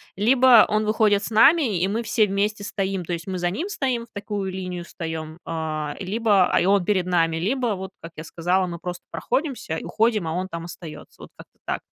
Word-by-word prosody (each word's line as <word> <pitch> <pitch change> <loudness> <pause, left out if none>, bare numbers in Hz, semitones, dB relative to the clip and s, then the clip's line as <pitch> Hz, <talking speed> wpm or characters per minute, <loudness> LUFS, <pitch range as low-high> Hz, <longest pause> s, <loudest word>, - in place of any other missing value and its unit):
Либо 245 +2 +6
он 215 0 +1
выходит 210 -2 +2
с - - -4
нами, 225 - +4
и 190 - +2
мы 230 +3 -1
все 220 0 +2
вместе 205 +1 -1
стоим. 195 -2 -2
То 175 - -7
есть, 170 +1 -4
мы 185 -1 -3
за 175 0 0
ним 320 - -3
стоим, 260 - -2
в - - -34
такую 205 -1 -4
линию 180 -2 -5
встаём, 160 -1 -6
а, 155 -2 -3
либо, 200 -1 +2
а - - +2
и - - +1
он 195 -2 +3
перед 185 -3 +1
нами, 165 -2 +1
либо 225 +6 0
вот, 190 0 -7
как 165 0 -10
я 155 - -7
сказала, 180 +3 0
мы 170 -2 -6
просто 180 0 -6
проходимся 260 - -2
уходим, 220 -4 +1
а 160 - -2
он 185 +2 -2
там 170 0 -6
остаётся. 170 -2 -10
Вот - - -11
как-то - - -16
так. - - -2
190 Hz, 215 wpm, -23 LUFS, 170-220 Hz, -, Либо